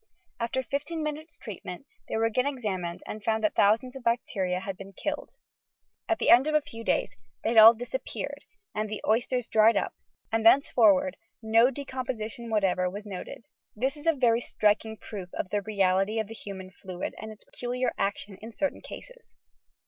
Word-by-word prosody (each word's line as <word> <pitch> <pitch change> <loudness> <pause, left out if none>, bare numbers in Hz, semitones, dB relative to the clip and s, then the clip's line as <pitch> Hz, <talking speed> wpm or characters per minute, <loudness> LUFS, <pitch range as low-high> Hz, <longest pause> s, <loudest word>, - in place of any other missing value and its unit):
After 235 +3 -1
lifteen 310 +3 -2
minutes' 305 +1 -5
treat 215 -8 -8
ment, 180 +8 -7 0.2
they - - -1
were 225 - +2
again 250 +4 +1
examined 190 -11 -3
and - - -5
it - - -11
was - - -24
found 220 0 0
that 215 - +2
thousands 230 +6 +3
of 265 - -8
bacteria 195 -6 0
had 195 0 -5
been 195 +1 -11
killed. 295 - -4 0.8
At 335 - +2
the - - +3
end 250 +5 +7
of 305 - +1
a 305 - +5
few 230 -5 -9
days - - 0 0.3
they - - +1
had 230 -1 +6
all 225 +2 +10
disappeared 245 - -5 0.3
and 215 0 -2
the 215 - -5
oysters 245 +2 +1
dried 220 +1 +5
up - - -1 0.4
and 225 0 +1
thenceforward 220 -6 +5 0.3
no 225 +3 +5
decomposition 245 -4 -5
whatever 185 -4 +2
was 205 +3 -7
noted! 200 +3 -7 0.3
This 260 +6 0
is 295 +2 -9
a 330 - +6
very 240 -4 +3
striking 220 0 +1
proof 190 -5 -8
of - - -3
the 205 - +1
reality 195 0 +1
of 220 - 0
the 225 - -8
human 190 -4 -8
fiuid 185 -1 -6
and 220 0 -7
its 215 - -13
peculiar 250 +1 -2
action 200 0 -2
in 225 +1 -9
certain 290 +3 -2
eases. - - -12
225 Hz, 190 wpm, -28 LUFS, 205-255 Hz, 0.8 s, all